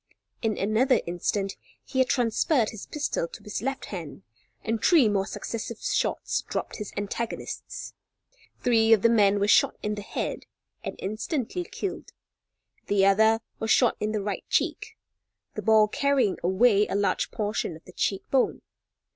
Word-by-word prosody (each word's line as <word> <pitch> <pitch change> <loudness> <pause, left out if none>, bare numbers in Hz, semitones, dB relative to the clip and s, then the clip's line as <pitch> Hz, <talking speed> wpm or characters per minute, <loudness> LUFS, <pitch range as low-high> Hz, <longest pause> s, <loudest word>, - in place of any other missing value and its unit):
In 220 -2 0
another 230 +5 +3
instant 195 +3 -2 0.3
he 260 - -3
had 260 -1 +3
transferred 245 +1 +2
his 220 - -9
pistol 290 - -2
to - - -12
his 210 - -4
left 270 +3 -3
hand, 165 -6 -7 0.4
and 225 0 -2
three 315 -10 +6
more 195 -2 +1
successive 230 0 -5
shots - - -1
dropped - - -4
his 210 -2 -6
antagonists. 205 +3 -5 0.7
Three 225 -2 +4
of 215 - +3
the 230 - +6
men 205 -3 +4
were 200 - +1
shot - - +4
in 210 - -1
the 205 - -5
head - - -4 0.4
and - - -5
instantly 245 - -3
killed. 385 +2 -6 0.7
The 200 -1 +3
other 220 +3 +4 0.2
was 220 - -3
shot 245 +1 +4
in 210 0 -1
the 210 -2 -2
right 200 -1 -3
cheek, - - -1 0.6
the 215 - -4
ball 215 +1 +5
carrying 275 -3 +1
away 200 +3 +4
a - - -3
large 200 0 +1
portion 210 -5 -2
of 160 - -15
the 185 - -14
cheek 195 +1 -1
bone. 265 -2 +1
215 Hz, 160 wpm, -26 LUFS, 200-235 Hz, 0.7 s, three